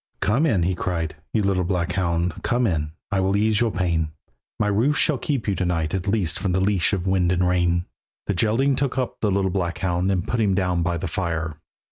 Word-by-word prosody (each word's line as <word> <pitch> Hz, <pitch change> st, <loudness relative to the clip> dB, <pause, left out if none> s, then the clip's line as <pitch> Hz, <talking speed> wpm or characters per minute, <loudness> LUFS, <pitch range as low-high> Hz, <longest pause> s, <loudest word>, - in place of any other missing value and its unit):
"Come 130 Hz, +10 st, +2 dB
in," 100 Hz, -, +2 dB
he 95 Hz, +2 st, +1 dB
cried, 85 Hz, -3 st, -2 dB, 0.2 s
"you 110 Hz, -, +1 dB
little 95 Hz, -2 st, +1 dB
black 90 Hz, -1 st, -1 dB
hound, 85 Hz, -2 st, -1 dB
Come 120 Hz, +1 st, +1 dB
in, 75 Hz, -6 st, -1 dB, 0.2 s
I 100 Hz, -, +1 dB
will 95 Hz, +1 st, +2 dB
ease 110 Hz, +1 st, +2 dB
your 120 Hz, -, +3 dB
pain; 85 Hz, -4 st, 0 dB, 0.5 s
My -, -, +2 dB
roof 115 Hz, +9 st, +2 dB
shall 150 Hz, -6 st, +2 dB
keep 135 Hz, -5 st, -2 dB
you 100 Hz, -, +2 dB
to 95 Hz, -, -1 dB
night 85 Hz, -3 st, -1 dB
at 95 Hz, +1 st, -2 dB
least 100 Hz, -6 st, +1 dB
From 95 Hz, -3 st, -1 dB
the 95 Hz, -, +2 dB
leash 95 Hz, -2 st, +2 dB
of 95 Hz, -3 st, -1 dB
wind 95 Hz, -2 st, +2 dB
and 90 Hz, 0 st, +2 dB
rain." 90 Hz, -1 st, +1 dB, 0.4 s
The 100 Hz, -, 0 dB
Geraldine 115 Hz, +8 st, +2 dB
took 135 Hz, 0 st, -1 dB
up 130 Hz, -2 st, -2 dB
the 105 Hz, -, +2 dB
little 95 Hz, -1 st, +1 dB
black 90 Hz, -2 st, -1 dB
hound, 90 Hz, 0 st, 0 dB
And 90 Hz, -3 st, -1 dB
put 120 Hz, -, -1 dB
him 100 Hz, -4 st, +2 dB
down 90 Hz, -3 st, +1 dB
by 85 Hz, 0 st, 0 dB
the 85 Hz, -, -3 dB
fire. 80 Hz, -3 st, -3 dB
95 Hz, 230 wpm, -23 LUFS, 85-105 Hz, 0.5 s, your